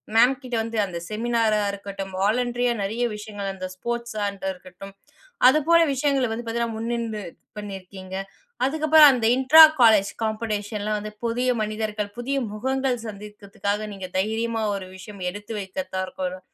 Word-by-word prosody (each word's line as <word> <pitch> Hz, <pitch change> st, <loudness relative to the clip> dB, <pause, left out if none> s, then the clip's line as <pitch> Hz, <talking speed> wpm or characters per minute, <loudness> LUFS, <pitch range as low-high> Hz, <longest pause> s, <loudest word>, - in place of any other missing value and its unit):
Ma'am 245 Hz, +4 st, +6 dB
கிட்ட 250 Hz, -2 st, -5 dB
வந்து 230 Hz, 0 st, -4 dB
அந்த 175 Hz, -3 st, -6 dB
செமினாரா 225 Hz, -1 st, +1 dB
இருக்கட்டும், 195 Hz, -1 st, -7 dB
வாலண்டரியா 245 Hz, +3 st, +1 dB
நெறைய 220 Hz, +5 st, -2 dB
விஷயங்கள் 205 Hz, -2 st, -5 dB
அந்த 185 Hz, -1 st, -6 dB
ஸ்போர்ட்ஸாண்டா 210 Hz, -3 st, -3 dB
இருக்கட்டும், 185 Hz, +2 st, -12 dB, 0.6 s
அதுபோல 310 Hz, +4 st, +4 dB
விஷயங்கள 270 Hz, -2 st, +1 dB
வந்து 235 Hz, +2 st, -4 dB
பார்த்தீங்கன்னா 230 Hz, 0 st, -2 dB
முன்னின்று 230 Hz, -2 st, -3 dB, 0.4 s
பண்ணியிருக்கீங்க. 190 Hz, -2 st, -8 dB, 0.5 s
அதுக்கப்புறம் 310 Hz, +1 st, +6 dB
அந்த 235 Hz, -3 st, 0 dB
இன்ட்ரா 290 Hz, +5 st, +9 dB, 0.2 s
காலேஜ் 210 Hz, -3 st, +6 dB
காம்படிஷன் 215 Hz, -1 st, -3 dB
லாம் 215 Hz, 0 st, 0 dB
வந்து 210 Hz, 0 st, -8 dB
புதிய 245 Hz, +2 st, 0 dB
மனிதர்கள், 215 Hz, -1 st, -3 dB
புதிய 270 Hz, +3 st, -2 dB, 0.2 s
முகங்கள் 260 Hz, +3 st, -1 dB
சந்தித்ததுக்காக 205 Hz, 0 st, -5 dB
நீங்க 190 Hz, -1 st, -6 dB
தைரியமா 225 Hz, +3 st, -1 dB
ஒரு 190 Hz, -1 st, -7 dB
விஷயம் 190 Hz, 0 st, -10 dB
எடுத்து 205 Hz, +3 st, -8 dB
வைத்ததா 190 Hz, 0 st, -5 dB
இருக்கட்டும் 185 Hz, 0 st, -5 dB
215 Hz, 135 wpm, -24 LUFS, 200-240 Hz, 0.6 s, இன்ட்ரா